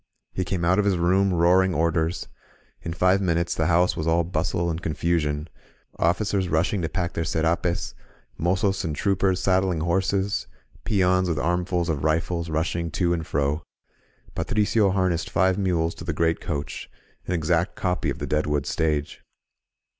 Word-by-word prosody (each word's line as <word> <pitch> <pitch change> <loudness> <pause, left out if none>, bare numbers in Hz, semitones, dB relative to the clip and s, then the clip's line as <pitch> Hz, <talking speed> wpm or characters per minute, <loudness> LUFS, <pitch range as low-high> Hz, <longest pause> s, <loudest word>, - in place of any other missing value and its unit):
He 95 - -1
came 90 -1 -2
out 95 +4 +3
of 105 - +2
his 100 -3 +2
room, 95 +3 +2
roaring 90 +1 +3
orders. 80 +1 0 0.5
In 85 - -5
five 90 +3 +2
min 85 -3 +1
utes 85 0 0
the 80 -1 0
house 90 +1 +3
was 80 - -3
all 85 +1 +3
bustle 85 0 -1
and 85 0 -2
confusion, 80 -2 -1 0.3
— - - -31
officers 95 +2 +1
rushing 85 +5 +1
to 80 - -2
pack 85 +1 -2
their 85 - -2
scrapes, 80 -4 -1 0.4
mozos 95 +3 0
and 80 -4 -2
troopers 95 +1 +1
sad 95 -1 +3
dling 90 -5 -1
horses, 95 +3 0 0.4
peons 95 -2 +2
with 80 - -1
armfuls 90 +2 0
of 75 -4 -2
rifles 85 +2 0
rushing 85 +2 -1
to 85 +1 0
and 80 -2 -3
fro. 70 +2 0 0.7
Patricio 105 0 +1
harnessed 95 -3 0
five 95 +2 +2
mules 85 -4 0
to - - -10
the 85 -1 -2
great 80 +1 0
coach, 75 -3 -5 0.2
— - - -36
an 90 - -1
exact 85 +2 0
copy 90 -2 -1
of - - -3
the - - -4
Deadwood 75 -1 0
Stage. 75 -2 -1
85 Hz, 170 wpm, -24 LUFS, 80-95 Hz, 0.7 s, out